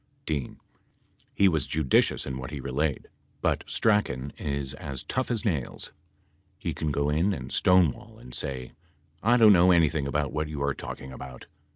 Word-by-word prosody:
D. 75 Hz, -5 st, -2 dB, 0.9 s
He 100 Hz, -, +5 dB
was 80 Hz, -7 st, +1 dB
judicious 75 Hz, -4 st, +2 dB
in 65 Hz, -1 st, -4 dB
what 65 Hz, -, -6 dB
he 75 Hz, -1 st, -6 dB
relayed, 70 Hz, +2 st, -2 dB, 0.3 s
but -, -, 0 dB
Strachan 70 Hz, -, +1 dB
is 70 Hz, -2 st, -3 dB
as 70 Hz, 0 st, -6 dB
tough 130 Hz, -, -2 dB
as 120 Hz, -1 st, -1 dB
nails. 75 Hz, -, -2 dB, 0.7 s
He -, -, -3 dB
can 80 Hz, -1 st, -2 dB
go 70 Hz, 0 st, 0 dB
in 85 Hz, +7 st, +2 dB
and 65 Hz, -6 st, -6 dB
stonewall 90 Hz, -6 st, +2 dB
and. 60 Hz, -, -13 dB
say,?'/ 65 Hz, -2 st, -4 dB, 0.5 s
don't 110 Hz, -1 st, +7 dB
know 90 Hz, 0 st, +6 dB
anything 80 Hz, -5 st, +3 dB
about 75 Hz, 0 st, -1 dB
what 75 Hz, 0 st, -1 dB
you 75 Hz, -2 st, -5 dB
are 70 Hz, 0 st, +1 dB
talking 65 Hz, 0 st, -8 dB
about.'" 65 Hz, -1 st, -9 dB
75 Hz, 165 wpm, -27 LUFS, 65-85 Hz, 0.9 s, don't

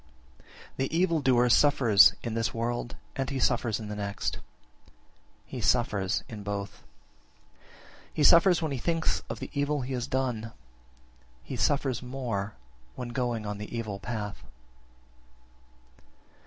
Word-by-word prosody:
17. -, -, -26 dB, 0.3 s
The 135 Hz, +5 st, -1 dB
evil 170 Hz, -3 st, +2 dB
doer 125 Hz, -2 st, +4 dB
suffers 120 Hz, -6 st, +6 dB
in 115 Hz, -, -3 dB
this 115 Hz, 0 st, -1 dB
world, 120 Hz, +1 st, -2 dB, 0.2 s
and 135 Hz, -2 st, -2 dB
he 135 Hz, -, -3 dB
suffers 120 Hz, -4 st, +1 dB
in 110 Hz, -, -6 dB
the 105 Hz, -, -5 dB
next; 100 Hz, -1 st, -3 dB, 1.1 s
he -, -, -6 dB
suffers 100 Hz, 0 st, +1 dB
in 110 Hz, -3 st, -8 dB
both. 100 Hz, -1 st, -5 dB, 1.3 s
He 150 Hz, -, -1 dB
suffers 170 Hz, +2 st, +6 dB
when 155 Hz, -, -1 dB
he 135 Hz, -, -2 dB
thinks 165 Hz, +4 st, 0 dB
of -, -, -5 dB
the -, -, -7 dB
evil 145 Hz, 0 st, 0 dB
he 130 Hz, +1 st, -4 dB
has 125 Hz, 0 st, -2 dB
done; 125 Hz, -5 st, -2 dB, 0.9 s
he 135 Hz, -, -6 dB
suffers 130 Hz, +2 st, +1 dB
more 120 Hz, -6 st, -4 dB, 0.4 s
when 125 Hz, -, -5 dB
going 120 Hz, -2 st, -2 dB
on 105 Hz, 0 st, -4 dB
the 105 Hz, +3 st, -6 dB
evil 105 Hz, -4 st, -4 dB
path. 105 Hz, -2 st, -5 dB
120 Hz, 140 wpm, -28 LUFS, 105-135 Hz, 1.3 s, suffers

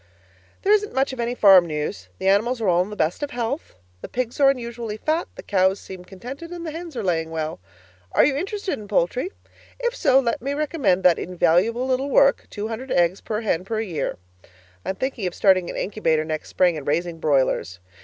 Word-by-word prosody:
There 405 Hz, -, +4 dB
isn't 420 Hz, -5 st, +1 dB
much 270 Hz, 0 st, +1 dB
of 260 Hz, -, -8 dB
any 240 Hz, +1 st, -1 dB
farm 190 Hz, -6 st, +7 dB
news. 150 Hz, -, -4 dB
The -, -, -3 dB
animals 225 Hz, +6 st, +3 dB
are 220 Hz, -, -1 dB
all 175 Hz, -1 st, +4 dB
in 185 Hz, -, -3 dB
the 210 Hz, -, -7 dB
best 160 Hz, -, 0 dB
of 290 Hz, -, -2 dB
health. 245 Hz, -, -4 dB, 0.3 s
The -, -, -7 dB
pigs 250 Hz, 0 st, -3 dB
are 275 Hz, -1 st, +6 dB
unusually 235 Hz, -4 st, -3 dB
fat, 315 Hz, +8 st, -1 dB
the -, -, -9 dB
cows 190 Hz, 0 st, +2 dB
seem 185 Hz, -2 st, -10 dB
contented 250 Hz, -, -9 dB
and 345 Hz, -1 st, -7 dB
the 315 Hz, -, -4 dB
hens 330 Hz, 0 st, -7 dB
are 230 Hz, -, -3 dB
laying 165 Hz, -3 st, 0 dB
well. 160 Hz, -, -4 dB, 0.5 s
Are -, -, +5 dB
you 275 Hz, -, +2 dB
interested 390 Hz, -, -3 dB
in 210 Hz, -, -10 dB
poultry? 215 Hz, -, 0 dB, 0.5 s
If -, -, -1 dB
so, 270 Hz, -, +4 dB
let 235 Hz, -4 st, -1 dB
me 275 Hz, +3 st, -2 dB
recommend 290 Hz, -, +1 dB
that 180 Hz, -2 st, +5 dB
invaluable 180 Hz, +7 st, +1 dB
little 260 Hz, +2 st, 0 dB
work, 275 Hz, 0 st, +4 dB
200 225 Hz, +5 st, -5 dB
Eggs 175 Hz, +2 st, +2 dB
per 215 Hz, 0 st, -3 dB
Hen 180 Hz, -6 st, 0 dB
per 215 Hz, +3 st, -3 dB
Year. 185 Hz, -8 st, -3 dB, 0.7 s
I -, -, -5 dB
am 190 Hz, -, -1 dB
thinking 260 Hz, -4 st, -2 dB
of 175 Hz, -, -5 dB
starting 185 Hz, -3 st, +3 dB
an -, -, -5 dB
incubator 160 Hz, -6 st, 0 dB
next 155 Hz, -1 st, -4 dB
spring 180 Hz, -2 st, +3 dB
and 145 Hz, -, -8 dB
raising 165 Hz, +2 st, -1 dB
broilers. 135 Hz, -, +1 dB
215 Hz, 210 wpm, -23 LUFS, 180-265 Hz, 0.7 s, farm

